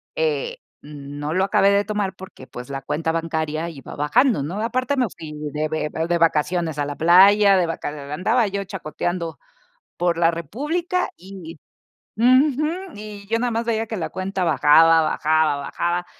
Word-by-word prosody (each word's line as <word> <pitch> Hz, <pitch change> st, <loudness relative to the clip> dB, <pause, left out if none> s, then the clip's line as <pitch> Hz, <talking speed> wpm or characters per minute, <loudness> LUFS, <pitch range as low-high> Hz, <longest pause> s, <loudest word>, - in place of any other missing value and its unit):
Eh, 155 Hz, -3 st, -1 dB, 0.2 s
mm, 145 Hz, -1 st, -10 dB
no 150 Hz, +3 st, -3 dB
lo 190 Hz, -, +2 dB
acabé 195 Hz, 0 st, +3 dB
de 200 Hz, 0 st, +2 dB
tomar 205 Hz, -2 st, -2 dB
porque, 185 Hz, -8 st, -12 dB
pues, 125 Hz, +2 st, -9 dB
la 135 Hz, 0 st, -4 dB
cuenta 150 Hz, +4 st, -2 dB
bancaria 160 Hz, 0 st, -2 dB
iba 140 Hz, -5 st, -10 dB
bajando, 220 Hz, -, +2 dB
¿no? 170 Hz, +9 st, -4 dB
Aparte, 255 Hz, +5 st, -1 dB
me 250 Hz, -, +3 dB
fui 155 Hz, -2 st, -9 dB, 0.2 s
de 155 Hz, +1 st, -1 dB
be 155 Hz, -1 st, -2 dB, 0.2 s
de 175 Hz, -, +2 dB
vacaciones 165 Hz, -1 st, +1 dB
a 145 Hz, -, 0 dB
la 145 Hz, 0 st, -5 dB
playa, 195 Hz, +4 st, +6 dB
de 175 Hz, -, +1 dB
vaca 165 Hz, -, -4 dB, 0.2 s
andaba 220 Hz, +8 st, +1 dB
yo 200 Hz, 0 st, -3 dB
chacoteando 175 Hz, -3 st, -4 dB, 0.6 s
por 175 Hz, -1 st, 0 dB
la 170 Hz, 0 st, +3 dB
república 315 Hz, -, -2 dB
y 180 Hz, -3 st, -11 dB, 0.6 s
ujú, 260 Hz, +5 st, +4 dB, 0.3 s
y 210 Hz, -1 st, -9 dB
yo 225 Hz, +2 st, 0 dB
nada 245 Hz, 0 st, 0 dB
más 230 Hz, +1 st, -2 dB
veía 225 Hz, -1 st, -1 dB
que 220 Hz, -, -4 dB
la 165 Hz, -, -3 dB
cuenta 190 Hz, 0 st, -3 dB
bajaba, 165 Hz, 0 st, +5 dB
bajaba, 155 Hz, -1 st, +1 dB
bajaba. 175 Hz, +5 st, -2 dB
175 Hz, 170 wpm, -22 LUFS, 155-210 Hz, 0.6 s, playa